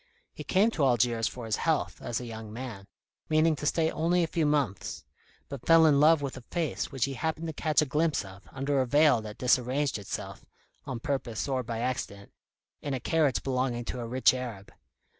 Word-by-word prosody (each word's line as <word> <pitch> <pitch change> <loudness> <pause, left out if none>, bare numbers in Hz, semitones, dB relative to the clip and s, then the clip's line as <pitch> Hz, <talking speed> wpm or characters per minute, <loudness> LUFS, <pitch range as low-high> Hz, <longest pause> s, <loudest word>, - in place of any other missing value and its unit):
He - - -8
came 205 +5 +3
to 160 - -1
Algiers 120 -3 +2
for 125 -2 -7
his 110 -1 -1
health, 160 -3 -1
as 120 - -3
a 125 - -7
young 110 -2 -8
man, 110 -4 -7 0.4
meaning 155 +1 +3
to 150 - -3
stay 160 +1 +1
only 175 +2 +1
a - - +2
few 160 -1 0
months, 140 -10 -1 0.4
but 140 -3 -8
fell 165 -1 +7
in 145 -3 +5
love 155 0 +5
with 135 - -4
a 130 - -8
face 170 -4 -2
which 135 -4 0
he 135 - -4
happened 160 +4 -3
to 160 - -4
catch 155 0 +2
a - - -2
glimpse 150 -2 0
of, 95 +1 -12
under 135 +1 0
a 130 - -1
veil 145 -2 +4
that 105 +1 -8
disarranged 125 +1 +1
itself 100 - -6 0.4
on 125 -3 -5
purpose 135 -5 -2
or 130 -2 0
by 115 -1 -4
accident 110 -5 -4 0.5
in 140 -2 -2
a - - -3
carriage 150 -1 +1
belonging 125 -2 -1
to 125 - -4
a 120 - -4
rich 130 +2 +4
Arab. 120 -6 -6
130 Hz, 205 wpm, -28 LUFS, 120-155 Hz, 0.5 s, fell